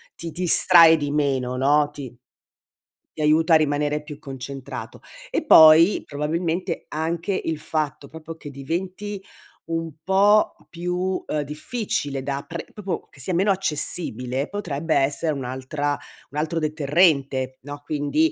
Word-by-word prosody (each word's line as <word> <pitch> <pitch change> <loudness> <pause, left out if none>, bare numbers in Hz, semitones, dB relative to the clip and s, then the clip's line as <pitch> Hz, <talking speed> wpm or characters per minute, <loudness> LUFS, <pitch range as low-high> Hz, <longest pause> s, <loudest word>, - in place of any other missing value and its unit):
ti 165 -1 -7
distrae 170 -1 +6
di 145 -2 -3
meno, 135 -4 0
no, 145 +3 +2
ti 135 -5 -8 1.1
ti 155 - -2
aiuta 160 +2 +4
a - - +9
rimanere 150 0 0
più 150 -2 -10
concentrato. 135 -1 -8 0.3
E - - -1
poi 165 - +7
probabilmente 165 +4 -2
anche 165 +5 -2
il 160 -1 -1
fatto 150 -1 -3
proprio 160 0 -9
che 145 -3 -9
diventi 185 +8 -4 0.5
un 165 0 -2
po' 205 +3 +4
più, 180 +2 -2
uhm, 150 - -2
difficile 150 - -3
da 140 +1 -4
pre 170 +2 -6
proprio 200 -3 -5
che - - -20
sia 160 +8 -2
meno 190 +4 +2
accessibile, 145 - -1
potrebbe 165 -6 -3
essere 145 +3 +1
un'altra 135 +2 -3 0.3
un 145 - -9
altro 160 +2 -1
deterrente, 145 -4 +1
no. 145 +1 -9
Quindi 155 - 0
155 Hz, 135 wpm, -23 LUFS, 140-170 Hz, 1.1 s, a